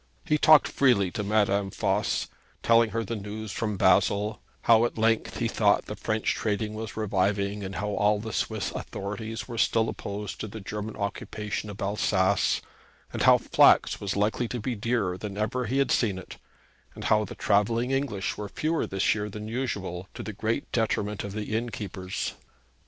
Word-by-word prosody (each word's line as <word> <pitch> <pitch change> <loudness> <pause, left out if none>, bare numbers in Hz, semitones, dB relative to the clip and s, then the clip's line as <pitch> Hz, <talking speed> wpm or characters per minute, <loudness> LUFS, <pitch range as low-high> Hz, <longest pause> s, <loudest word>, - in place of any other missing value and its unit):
He 150 -2 +2
talked 155 0 +7
freely 105 -9 +3
to 105 - -3
Madame 100 -1 +2
Voss, - - 0 0.4
telling 115 -1 +5
her 115 +1 -2
the 115 +2 -4
news 105 +1 -6
from 105 -2 -2
Basle, 105 +3 +3 0.2
how 115 -1 +6
at 120 - -1
length 115 0 +1
he - - 0
thought - - +2
the - - -6
French 110 0 -1
trade 105 0 -1
was 110 0 -6
reviving, 100 0 0
and 95 0 -5
how 105 +2 -2
all 105 +1 +2
the 110 0 -6
Swiss - - -1
authorities 110 +3 -5
were 120 -2 -5
still 115 0 +3
opposed 100 0 -5
to - - -4
the 110 +2 -8
German 105 +2 -5
occupation 105 0 -4
of 100 - -8
Alsace; 100 -1 +1 0.5
and - - -3
how - - +7
flax - - +4
was 100 -1 -2
likely 105 +4 +1
to 120 - -4
be 120 +3 -2
dearer 105 -4 -1
than 100 -2 -6
ever 110 +3 -1
he 130 +5 0
had 140 - +2
seen 105 -6 +2
it; 95 - -9 0.6
and - - -8
how 110 0 +3
the - - -7
travelling 115 +5 +1
English 135 -8 -1
were 105 -1 -5
fewer 160 +7 -1
this 95 0 +2
year 105 -1 -3
than 105 +1 -7
usual, 100 -7 -3
to - - -6
the 110 - -6
great 110 +6 -2
detriment 105 -3 0
of 100 - -6
the 105 +1 -3
innkeepers. 105 -5 -3
105 Hz, 180 wpm, -27 LUFS, 100-115 Hz, 0.6 s, talked